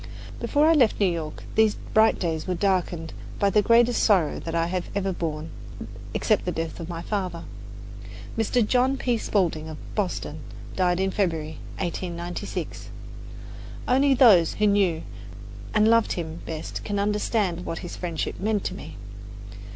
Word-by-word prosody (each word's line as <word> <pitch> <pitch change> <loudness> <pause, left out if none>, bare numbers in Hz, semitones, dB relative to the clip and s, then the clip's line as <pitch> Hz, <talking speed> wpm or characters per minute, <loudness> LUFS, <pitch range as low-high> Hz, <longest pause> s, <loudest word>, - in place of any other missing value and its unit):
Before 295 +1 +2
I 325 - +6
left 255 -9 +3
New 205 - +4
York, 165 -4 -3
these 220 -1 +4
bright 220 +1 +3
days 165 -2 -2
were 180 - 0
darkened 175 -4 0 0.2
by 200 -1 +2
the 210 - +4
greatest 235 +2 +4
sorrow 185 -8 +3
that 165 0 -5
I 165 0 +2
have 180 +1 -2
ever 195 -1 0
borne, 160 -2 -4 0.6
except - - +2
the - - -1
death 165 +1 -4
of 165 0 -6
my 170 -1 -5
father. 185 -5 -3 0.9
Mr. 225 +1 +2
John 255 +3 +2
P. 245 -3 0
Spaulding, 165 -8 0
of 155 - -7 0.2
Boston, 180 -6 -2 0.4
died 180 -1 +2
in 190 0 +1
February, 160 -6 -1 0.2
1896. 175 -1 -4 1.0
Only 270 +2 +4
those 210 - +6
who 210 - +1
knew 195 -6 +2 0.7
and 215 0 +4
loved 230 0 +4
him 165 -1 -5
best 160 -1 -5
can 205 -1 -2
understand 205 -3 0
what 165 - -4
his 175 - -6
friendship 170 -3 -3
meant 210 +1 0
to - - -3
me. - - -9
185 Hz, 155 wpm, -25 LUFS, 165-215 Hz, 1.0 s, I